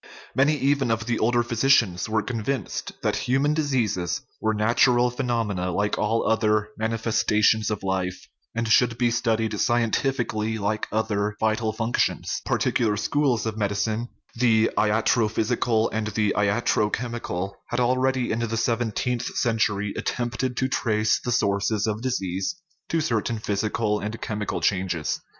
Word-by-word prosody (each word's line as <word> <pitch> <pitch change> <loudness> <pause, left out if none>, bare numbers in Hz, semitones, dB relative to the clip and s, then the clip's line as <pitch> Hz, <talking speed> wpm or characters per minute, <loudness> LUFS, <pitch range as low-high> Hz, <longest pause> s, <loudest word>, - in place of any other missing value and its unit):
Many 145 +3 +3
even 140 -2 +1
of 115 -1 0
the 120 -1 -1
older 120 +1 +2
physicians 115 -5 +2
were 110 -1 +1
convinced 125 +3 -3
that - - +1
human 140 +4 +3
diseases 120 - 0 0.2
were 110 0 +1
natural 120 +3 +3
phe 125 - -16
nomena, 105 -7 -1
like 105 0 0
all 110 +2 +1
other 105 -1 +2
manifestations 110 -1 +1
of 105 -2 -3
life, 95 -1 -2 0.3
and 115 0 -1
should 115 +2 +3
be 120 -1 +2
studied 110 -2 0
scientifically, 115 -2 0
like 105 +1 -1
other 105 -1 -1
vital 110 0 +1
functions. 115 +2 -1
Par - - +1
ticular 110 -4 +1
schools 130 +1 +1
of 110 -1 -3
medicine 105 +3 -1 0.2
the 115 -2 +3
latrophysical 110 +1 +1
and 110 0 -1
the 105 -1 0
latrochemical 105 -1 0 0.2
had 120 - -2
already, 130 +1 +1
in 110 - -1
the 115 -1 -2
seventeenth 120 +1 -1
cen 115 -3 +1
tury, 105 -1 0
attempted 120 +1 -2
to 130 - +1
trace 110 -4 +1
the 125 - -2
sources 100 -2 +1
of 110 0 -2
disease 100 - -2 0.3
to 165 - +1
certain 115 -3 -1
physical 105 0 -1
and 110 +2 -5
chemical 105 -2 -3
changes. 90 -5 0
110 Hz, 140 wpm, -24 LUFS, 105-120 Hz, 0.3 s, Many